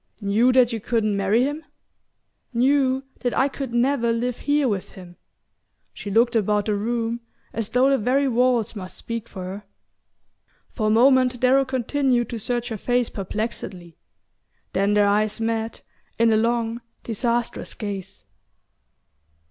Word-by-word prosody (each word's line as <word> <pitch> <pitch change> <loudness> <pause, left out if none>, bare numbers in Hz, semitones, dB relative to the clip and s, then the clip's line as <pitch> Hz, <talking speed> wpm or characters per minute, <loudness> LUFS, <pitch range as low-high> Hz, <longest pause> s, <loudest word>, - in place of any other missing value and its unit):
"Knew 220 +4 +3
that 250 -2 +4
you 225 - -2
couldn't 215 -1 0
marry 200 +5 +2
him?" 295 +4 -2 0.9
"Knew 265 +1 +2 0.2
that 245 -2 -2
I 270 - +4
could 270 -2 -5
never 240 0 +2
live 240 +1 -2
here 290 -1 +1
with 200 -5 -3
him." 180 -2 -12 0.8
She 205 - -7
looked 230 +4 +3
about 210 -1 +2
the 215 - 0
room, 230 +2 -2 0.3
as 225 -3 -3
though 250 +2 +3
the 275 -1 +3
very 265 +5 +2
walls 245 -2 +2
must 185 -3 -8
speak 230 -1 -5
for 185 - -7
her. 190 +3 -6 1.1
For 215 -3 -1
a - - +3
moment 250 +2 +4
Darrow 265 +2 +4
continued 260 -1 0
to 230 - -4
search 240 +3 -2
her 220 - -4
face 245 +2 0
perplexedly; 190 -4 -5 0.8
then 200 +2 +2
their 205 0 +5
eyes 210 +2 +1
met 225 0 -2 0.3
in 230 -1 +4
a - - +4
long 230 +1 0 0.2
disastrous 235 +1 -2
gaze. 195 - -6
230 Hz, 150 wpm, -23 LUFS, 210-250 Hz, 1.1 s, their